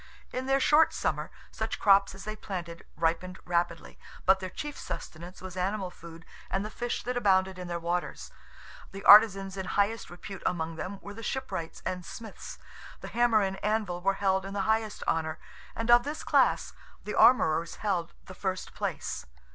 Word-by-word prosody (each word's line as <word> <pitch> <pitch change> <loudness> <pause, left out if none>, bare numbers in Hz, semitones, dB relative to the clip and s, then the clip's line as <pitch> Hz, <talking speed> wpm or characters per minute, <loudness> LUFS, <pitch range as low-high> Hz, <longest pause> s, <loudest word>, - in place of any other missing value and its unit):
In 255 +1 -3
their 270 0 +3
short 300 +4 +5
summer, - - -1 0.2
such - - -3
crops 195 -1 +4
as 195 - -10
they 215 0 -5
planted 175 -5 -7
ripened 170 +3 0
rapidly, 170 - -2 0.3
but 190 +1 +5
their 185 -1 -5
chief 295 +8 -6
sustenance 175 +4 -8
was 185 -1 -7
animal 190 0 -2
food 165 -1 -12 0.2
and 195 +2 -1
the 215 - -6
fish 240 +1 -3
that 250 +1 -2
abounded 190 -5 +2
in 180 - -6
their 175 0 -2
waters. 175 +1 -3 0.6
The 195 0 -8
artizans 195 -2 +7
in 190 -1 -4
highest 205 +3 0
repute 190 +2 -9
among 165 -2 -1
them 185 +5 -5
were 205 - -8
the 225 - -9
shipwrights 230 -9 -4
and 180 -1 -3
smiths. 220 +4 -9 0.4
The - - -7
hammer 235 -2 +3
and 195 0 -3
anvil 210 -5 0
were 195 +2 +2
held 190 -1 +1
in 195 +1 -6
the 200 - 0
highest 220 +1 0
honour; 160 -1 0 0.4
and 230 +1 0
of 240 0 +8
this 295 +4 -5
class, - - +2 0.3
the - - -4
armorers 165 -9 +4
held 180 -5 -2
the 185 - -10
first 185 0 -4
place. - - -4
195 Hz, 180 wpm, -29 LUFS, 175-215 Hz, 0.6 s, of